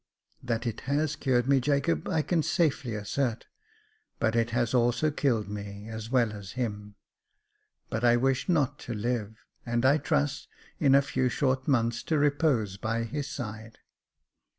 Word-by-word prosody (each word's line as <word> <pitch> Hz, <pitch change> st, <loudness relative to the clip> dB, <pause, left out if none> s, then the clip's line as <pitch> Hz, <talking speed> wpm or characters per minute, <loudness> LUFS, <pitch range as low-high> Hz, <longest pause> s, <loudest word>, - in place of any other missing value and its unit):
" -, -, -38 dB
That 115 Hz, +1 st, -1 dB
it 115 Hz, -2 st, -3 dB
has 150 Hz, +2 st, +1 dB
cured 130 Hz, -4 st, +1 dB
me, 140 Hz, -1 st, +4 dB
Jacob, 135 Hz, -, 0 dB
I 155 Hz, -1 st, +1 dB
can 170 Hz, 0 st, +1 dB
safely 155 Hz, -7 st, 0 dB
assert 115 Hz, +3 st, -1 dB
j -, -, -20 dB, 0.7 s
but 110 Hz, 0 st, +1 dB
it 115 Hz, 0 st, +2 dB
has 120 Hz, 0 st, 0 dB
also 125 Hz, +5 st, +2 dB
killed 120 Hz, -8 st, 0 dB
me 100 Hz, +1 st, -7 dB
as 110 Hz, 0 st, -6 dB
well 120 Hz, -4 st, +2 dB
as 100 Hz, -2 st, -8 dB
him. 105 Hz, -4 st, -4 dB, 1.0 s
But 110 Hz, -, -2 dB
I 120 Hz, 0 st, +5 dB
wish 135 Hz, +6 st, 0 dB
not 150 Hz, -7 st, +1 dB
to 120 Hz, -, -5 dB
live: 110 Hz, -1 st, -2 dB, 0.3 s
and 120 Hz, 0 st, 0 dB
I 140 Hz, +4 st, +5 dB
trust, 145 Hz, -1 st, -1 dB, 0.3 s
in 135 Hz, -3 st, +5 dB
a 140 Hz, -, +5 dB
few 130 Hz, -2 st, 0 dB
short 130 Hz, 0 st, 0 dB
months, 115 Hz, -4 st, +1 dB
to 160 Hz, -, +1 dB
repose 145 Hz, -9 st, +1 dB
by 115 Hz, +2 st, -1 dB
his 140 Hz, +5 st, -4 dB
side." 110 Hz, -2 st, -7 dB
120 Hz, 170 wpm, -28 LUFS, 110-140 Hz, 1.0 s, I